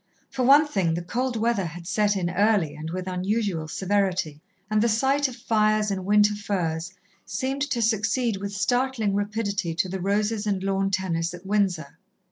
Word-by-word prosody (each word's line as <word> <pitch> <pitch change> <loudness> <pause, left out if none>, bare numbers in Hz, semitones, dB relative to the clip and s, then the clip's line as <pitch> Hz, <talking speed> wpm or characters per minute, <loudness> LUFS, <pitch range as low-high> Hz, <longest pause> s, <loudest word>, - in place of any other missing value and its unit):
For 260 - -3
one 280 +5 +6
thing 190 - 0
the 170 - -3
cold 245 +7 -2
weather 225 -2 +1
had 170 +1 -8
set 205 +3 +1
in 175 -2 -1
early 195 -5 +2
and 155 +1 -6
with 185 +2 -4
unusual 185 -2 -1
severity, 185 -5 -1 0.3
and 215 0 +1
the 235 - +3
sight 270 +6 +2
of 255 - -8
fires 215 -3 +1
and 190 -2 -3
winter 210 +1 +4
furs 175 -5 -2 0.3
seemed 270 +2 -3
to 235 -3 0
succeed 220 +1 +1
with 200 +1 -5
startling 225 +2 0
rapidity 200 -4 -2
to 180 - 0
the 190 0 -4
roses 210 +2 0
and 195 -2 -1
lawn 195 0 0
tennis 175 -3 -1
at 175 +2 -13
Windsor. 190 -7 -1
200 Hz, 175 wpm, -25 LUFS, 180-220 Hz, 0.3 s, one